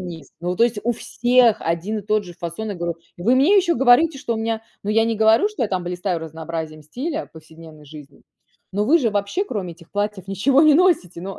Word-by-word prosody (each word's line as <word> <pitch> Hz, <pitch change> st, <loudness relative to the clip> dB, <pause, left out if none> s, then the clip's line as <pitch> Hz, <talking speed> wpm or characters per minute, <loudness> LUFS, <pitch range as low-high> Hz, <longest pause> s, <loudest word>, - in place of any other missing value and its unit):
низ. 170 Hz, -6 st, -8 dB
Ну 175 Hz, +1 st, -2 dB
то 230 Hz, -, +4 dB
есть 235 Hz, -2 st, -1 dB
у 240 Hz, -, +2 dB
всех 240 Hz, 0 st, +2 dB
один 170 Hz, +6 st, -2 dB
и -, -, -15 dB
тот 210 Hz, 0 st, 0 dB
же 175 Hz, -1 st, -11 dB
фасон. 170 Hz, +7 st, -6 dB
Я 205 Hz, -, -4 dB
говорю: 170 Hz, -1 st, -4 dB, 0.2 s
"Вы 220 Hz, +9 st, +2 dB
мне 295 Hz, +11 st, +4 dB
еще 355 Hz, -3 st, +3 dB
говорите, 270 Hz, +5 st, +4 dB
что 250 Hz, -4 st, -3 dB
у -, -, -3 dB
меня, 225 Hz, 0 st, -2 dB, 0.2 s
ну 205 Hz, -, -3 dB
я 225 Hz, +1 st, +3 dB
не 230 Hz, -1 st, -1 dB
говорю, 220 Hz, -, +4 dB
что 425 Hz, -, -5 dB
я 220 Hz, -, 0 dB
там 185 Hz, -2 st, -2 dB
блистаю 180 Hz, 0 st, -3 dB
разнообразием 160 Hz, -1 st, -6 dB
стиля 295 Hz, -, -5 dB
повседневной 160 Hz, -1 st, -14 dB
жизни, 145 Hz, -1 st, -13 dB, 0.5 s
но 205 Hz, +2 st, 0 dB
вы 320 Hz, +8 st, +4 dB
же 235 Hz, -6 st, +1 dB
вообще 205 Hz, -, -1 dB
кроме 195 Hz, -, -5 dB
этих 170 Hz, 0 st, -19 dB
платьев 205 Hz, -2 st, -3 dB
ничего 250 Hz, +9 st, +2 dB
не 305 Hz, -2 st, +6 dB
носите". 330 Hz, -, +2 dB
Но 195 Hz, 0 st, -7 dB
205 Hz, 225 wpm, -21 LUFS, 170-245 Hz, 0.5 s, не